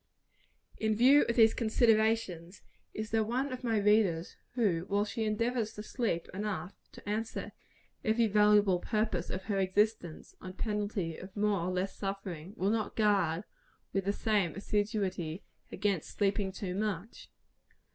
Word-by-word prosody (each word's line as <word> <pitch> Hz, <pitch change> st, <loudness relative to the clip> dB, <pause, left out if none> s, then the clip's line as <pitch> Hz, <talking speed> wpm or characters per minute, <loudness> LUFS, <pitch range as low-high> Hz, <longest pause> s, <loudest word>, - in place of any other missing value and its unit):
In 220 Hz, -1 st, +1 dB
view 265 Hz, +6 st, +6 dB
of 235 Hz, -, +1 dB
these 225 Hz, -2 st, +6 dB
considerations, 220 Hz, -6 st, +1 dB, 0.3 s
is 215 Hz, 0 st, -5 dB
there 220 Hz, 0 st, +3 dB
one 255 Hz, +5 st, -1 dB
of 255 Hz, -, -7 dB
my 230 Hz, -2 st, +1 dB
readers, 205 Hz, -5 st, +2 dB, 0.2 s
who, 185 Hz, -9 st, +1 dB
while 205 Hz, +1 st, +1 dB
she 220 Hz, +1 st, -3 dB
endeavors 225 Hz, +1 st, 0 dB
to 210 Hz, -, -6 dB
sleep 215 Hz, -8 st, -2 dB
enough 195 Hz, -2 st, -3 dB, 0.2 s
to -, -, -13 dB
answer 220 Hz, +2 st, -3 dB, 0.5 s
every 230 Hz, -1 st, +3 dB
valuable 210 Hz, -3 st, +4 dB
purpose 210 Hz, -4 st, -1 dB
of 185 Hz, -, -4 dB
her 200 Hz, -1 st, -1 dB
existence, 190 Hz, -3 st, 0 dB
on 185 Hz, 0 st, -7 dB
penalty 205 Hz, -5 st, -2 dB
of 190 Hz, +2 st, -11 dB
more 205 Hz, -1 st, +2 dB
or 170 Hz, +2 st, -2 dB
less 185 Hz, +1 st, -2 dB
suffering, 195 Hz, -2 st, -5 dB
will 195 Hz, +3 st, +1 dB
not 220 Hz, -2 st, -1 dB
guard, 200 Hz, -5 st, +2 dB, 0.5 s
with 195 Hz, -1 st, 0 dB
the 200 Hz, -, +2 dB
same 205 Hz, -4 st, 0 dB
assiduity, 195 Hz, -4 st, -2 dB, 0.3 s
against 200 Hz, -6 st, -2 dB
sleeping 200 Hz, -1 st, +1 dB
too 190 Hz, -1 st, -5 dB
much? 205 Hz, +1 st, -4 dB
205 Hz, 145 wpm, -31 LUFS, 185-220 Hz, 0.5 s, view